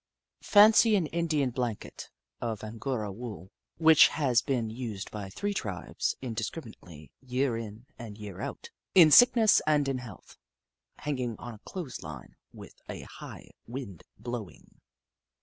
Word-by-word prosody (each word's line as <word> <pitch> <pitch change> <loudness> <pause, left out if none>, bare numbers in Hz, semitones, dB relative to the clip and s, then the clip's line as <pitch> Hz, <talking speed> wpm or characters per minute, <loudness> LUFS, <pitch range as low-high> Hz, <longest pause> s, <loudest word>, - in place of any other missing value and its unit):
Fancy 215 +1 +6
an 185 -5 +2
Indian 155 -5 0
blanket, 120 -3 -5 0.3
of 110 -3 -3
Angora 110 0 -4
wool, 100 -4 -8 0.3
which 160 -2 +7
has 135 -6 +1
been 120 -5 -1
used 110 -4 -6
by 100 -2 -6
three 205 - -3
tribes 95 - -3
indis 115 -3 -3
criminately, 90 - -11
year 130 -1 -1
in 115 +1 -7
and 110 -4 -8
year 105 -4 -8
out, - - -6 0.2
in 165 -5 +8
sickness 235 +1 +7
and 150 -2 +3
in 135 -2 -1
health, 115 -6 -12 0.6
hanging 130 -6 -3
on 120 -1 -8
a 105 - -13
clothes 170 -9 -6
line 75 -5 -10 0.2
with - - -13
a - - -7
hio^h - - -10 0.2
wind 120 - -7 0.2
blowinof. 110 - -8
120 Hz, 140 wpm, -29 LUFS, 105-150 Hz, 0.6 s, in